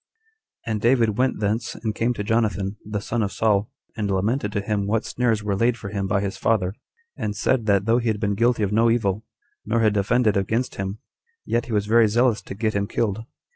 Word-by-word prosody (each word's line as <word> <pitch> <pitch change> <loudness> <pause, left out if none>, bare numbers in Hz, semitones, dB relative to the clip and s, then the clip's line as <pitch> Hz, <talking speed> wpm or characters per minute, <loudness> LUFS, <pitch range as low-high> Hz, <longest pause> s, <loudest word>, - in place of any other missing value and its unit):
6. 115 - -3
And 105 -1 -1
David 115 -3 +3
went 130 -3 +1
thence, 105 +3 -1
and 110 -2 -3
came 115 +3 0
to 105 - -3
Jonathan, 105 -2 0
the 105 -1 -4
son 115 +2 -2
of 100 -2 -1
Saul, 105 -2 +1 0.3
and 105 -3 -2
lamented 105 +4 0
to 100 - 0
him 100 -1 -1
what 110 +2 0
snares 115 -3 0
were 100 -1 0
laid 115 +4 +2
for 100 - -7
him 100 -1 -2
by 100 0 +1
his 100 -1 -3
father; 95 -5 +1 0.4
and 105 -1 -3
said, 110 +2 0
that 100 -1 +3
though 115 +2 +3
he 120 - -3
had 110 -2 0
been 100 -1 0
guilty 115 +1 +2
of 100 - 0
no 115 +2 +4
evil, 110 -3 0 0.4
nor 115 +2 0
had 110 -2 +3
offended 110 +2 +2
against 110 +6 0
him, 95 +1 -4 0.5
yet 120 0 -1
he - - -7
was 105 -2 +1
very 115 +1 +5
zealous 120 +1 +2
to - - -8
get 110 +2 -1
him 100 0 -1
killed. 110 0 -1
110 Hz, 225 wpm, -23 LUFS, 100-115 Hz, 0.5 s, very